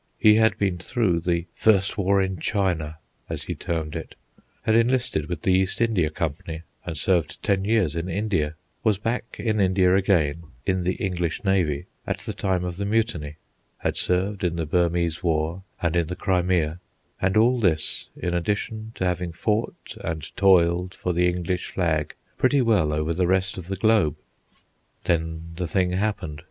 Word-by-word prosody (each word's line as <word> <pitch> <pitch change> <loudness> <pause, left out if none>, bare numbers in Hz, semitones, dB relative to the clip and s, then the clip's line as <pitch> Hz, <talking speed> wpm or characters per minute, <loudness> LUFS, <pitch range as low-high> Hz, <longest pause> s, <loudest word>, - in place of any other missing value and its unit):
He 105 0 +6
had 110 0 +4
been 95 -3 0
through 105 -9 +1
the 85 0 0
"First 100 -3 +3
War 100 -1 +2
in 95 -2 -3
China," 80 -6 -1 0.3
as - - -3
he - - -3
termed 80 -3 -3
it; - - -6 0.5
had 110 - +3
enlisted 115 - +2
with 85 -3 -4
the 95 - +3
East 95 0 +1
India 110 -9 +2
Company 80 +1 -4 0.2
and 85 -3 -5
served 85 -2 0
ten 100 -2 +1
years 105 -8 +2
in 85 +2 -3
India; 90 -6 -1 0.3
was 110 -4 +3
back 115 +3 -3
in 110 -2 0
India 95 -1 +4
again, 85 -5 +2 0.2
in 95 -1 +1
the 90 - +1
English 90 -3 -2
navy, 90 -8 +1 0.2
at - - -1
the - - -5
time 95 -2 0
of 90 -1 -4
the 100 - -2
Mutiny; 105 -9 0 0.4
had - - -1
served 95 +2 +1
in 85 -2 +1
the 85 -1 -2
Burmese 85 0 +1
War 80 +1 0 0.2
and 85 0 +1
in 85 -2 +2
the 90 - -4
Crimea; 90 -4 +1 0.4
and 95 +2 +2
all 120 +3 +4
this 80 -8 0
in 90 - -2
addition 110 +5 -2
to 95 - -2
having 90 -1 -1
fought 105 +6 -2
and 80 -2 -4
toiled 90 -1 +4
for 90 - -2
the 90 +1 +3
English 90 0 -2
flag 80 -4 -1 0.2
pretty 130 +1 +4
well 105 -10 +3
over 75 +2 0
the 90 +1 +1
rest 95 +1 +1
of 90 -3 -8
the 95 - -2
globe. 105 -7 +3 0.9
Then 80 -1 -1
the 90 -1 -2
thing 90 +2 +1
happened. 95 -6 -2
90 Hz, 175 wpm, -24 LUFS, 85-100 Hz, 0.9 s, He